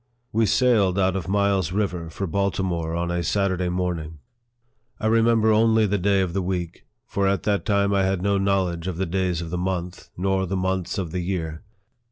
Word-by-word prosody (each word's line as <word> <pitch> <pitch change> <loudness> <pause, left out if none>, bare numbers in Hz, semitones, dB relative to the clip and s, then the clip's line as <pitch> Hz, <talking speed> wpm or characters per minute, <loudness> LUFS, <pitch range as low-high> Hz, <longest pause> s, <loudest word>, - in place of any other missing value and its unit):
We 110 0 +3
sailed 105 -4 +3
out 95 -1 +2
of 95 -3 -3
Miles 100 -3 +1
River 90 -4 -2
for 95 +4 -4
Baltimore 90 -3 -1
on 85 0 -1
a 85 0 -1
Saturday 95 +1 0
morning. 90 -3 -3 0.8
I - - -4
remember 115 0 +4
only 110 0 +4
the 100 0 0
day 100 +1 +2
of 90 -3 -2
the 95 - 0
week, 90 -2 -4 0.2
for 100 -4 0
at 100 -1 0
that 100 -1 0
time 100 -2 +2
I 100 - +3
had 95 -1 0
no 100 0 +2
knowledge 95 -3 0
of 90 -3 -3
the 95 - 0
days 90 -1 -1
of 80 - -7
the 90 - -2
month, 90 -1 -4
nor 95 +1 0
the 95 +2 -2
months 95 -1 -1
of 90 -5 -3
the 90 - -2
year. 80 -3 -3
95 Hz, 200 wpm, -24 LUFS, 90-100 Hz, 0.8 s, remember